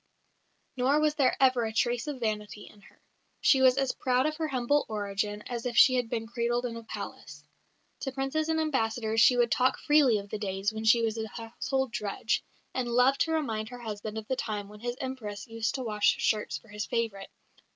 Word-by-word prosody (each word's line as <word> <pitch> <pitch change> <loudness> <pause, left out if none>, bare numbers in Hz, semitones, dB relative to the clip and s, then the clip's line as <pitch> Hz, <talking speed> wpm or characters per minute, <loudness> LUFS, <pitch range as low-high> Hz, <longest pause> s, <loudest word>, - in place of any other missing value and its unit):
Nor 265 +4 +3
was 305 -1 +2
there 275 -4 +2
ever 255 -2 +4
a 220 - -2
trace 240 +3 0
of 280 -4 -5
vanity 210 -2 -3
in 205 - -17
her. - - -20 0.4
She 265 - +4
was 260 0 +5
as 270 -1 +1
proud 255 +1 +1
of 310 0 0
her 320 -1 -1
humble 270 +1 +1
origin 205 0 -3
as 240 -2 -5
if 240 - -4
she 255 - +8
had 245 -2 0
been 225 -2 -2
cradled 240 +1 -1
in 235 -2 -4
a 230 - -6
palace. 225 - -8 0.6
To 270 - -3
princes 270 +4 -1
and 320 0 +1
ambassadors 225 -7 0
she 250 +3 +6
would 240 -2 +3
talk 255 +3 +2
freely 295 -7 +4
of 200 0 -7
the 215 - -3
days 195 +1 -2
when 220 0 -5
she 230 +1 +5
was 225 0 -1
a 220 - -3
household 235 +4 -3
drudge, 210 +1 -1 0.3
and 255 -2 -1
loved 250 +3 +3
to 325 - +2
remind 225 -9 -1
her 245 - -8
husband 215 -1 -5
of 215 -1 -6
the 260 - 0
time 210 -4 -4
when 210 0 -12
his 240 +2 -4
Empress 225 -6 -5
used 225 -1 -2
to 260 - -3
wash 210 -3 +2
shirts 215 -1 0
for 225 - -19
his 210 0 -5
favourite. 220 -4 -2
235 Hz, 215 wpm, -29 LUFS, 215-260 Hz, 0.6 s, she